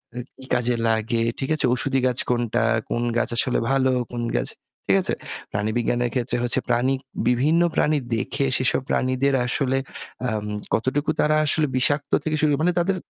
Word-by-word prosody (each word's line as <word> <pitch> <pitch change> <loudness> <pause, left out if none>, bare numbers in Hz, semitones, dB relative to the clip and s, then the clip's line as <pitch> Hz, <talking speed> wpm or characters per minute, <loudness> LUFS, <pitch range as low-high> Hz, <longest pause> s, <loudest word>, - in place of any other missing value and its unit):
আ - - -7 0.2
কি 130 - -10
কাজে 120 0 +1
লাগে, 115 +1 +1 0.2
ঠিক 135 - -3
আছে? 150 - +1
ওষুধি 135 +1 +1
গাছ 125 - 0
কোনটা? 120 -2 +1 0.3
কোন 120 - -1
গাছ 125 - +1
আসলে 125 - +2
ভালো 130 -1 +3 0.2
কোন 120 0 -3
গাছ - - -1 0.4
ঠিক - - +4
আছে? - - -1 0.4
প্রাণীবিজ্ঞানের 120 +3 0
ক্ষেত্রে 120 -1 -1 0.3
প্রাণী 130 +3 +2 0.3
বিভিন্ন 145 +8 +3
প্রাণী 150 0 +2 0.2
দেখে 135 +4 -1
সেসব 130 +1 +1
প্রাণীদের 130 +2 +1
আসলে 135 +1 0 0.5
আম 105 -1 -3 0.3
কতটুকু 130 +6 0
তারা 155 0 +3
আসলে 150 0 +2
বিষাক্ত 145 +3 +1
থেকে 155 -1 -1
শুরু 155 - +3
করে 140 - +1
মানে 180 - +3
তাদের 190 +2 +1
130 Hz, 165 wpm, -23 LUFS, 120-145 Hz, 0.5 s, ঠিক